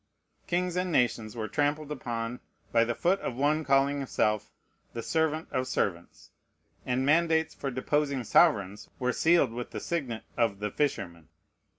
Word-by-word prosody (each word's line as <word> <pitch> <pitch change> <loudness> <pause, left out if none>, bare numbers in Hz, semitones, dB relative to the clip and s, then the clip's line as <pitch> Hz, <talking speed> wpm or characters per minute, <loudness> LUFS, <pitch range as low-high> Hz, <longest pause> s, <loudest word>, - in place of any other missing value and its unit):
Kings 180 0 0
and 180 0 -1
nations 120 -5 +1
were 110 -2 -3
trampled 145 +3 -1
upon 120 -3 -4 0.3
by 115 -1 +4
the 120 0 -2
foot 185 +3 +2
of 120 - -4
one 150 +4 +1
calling 140 0 +2
himself 110 -6 0 0.4
"The 115 - -5
Servant 160 +2 0
of 130 0 -1
Servants"; 85 -8 -3 0.6
and 125 +1 +1
mandates 160 +1 +3
for 135 - -4
deposing 140 +1 0
sovereigns 100 -2 +3
were 125 0 0
sealed 165 -7 +3
with 120 +1 -5
the - - -5
signet 135 -10 -3
of 115 -4 +1
"The 105 +1 -3
Fisherman." 90 - -2
130 Hz, 155 wpm, -29 LUFS, 115-155 Hz, 0.6 s, by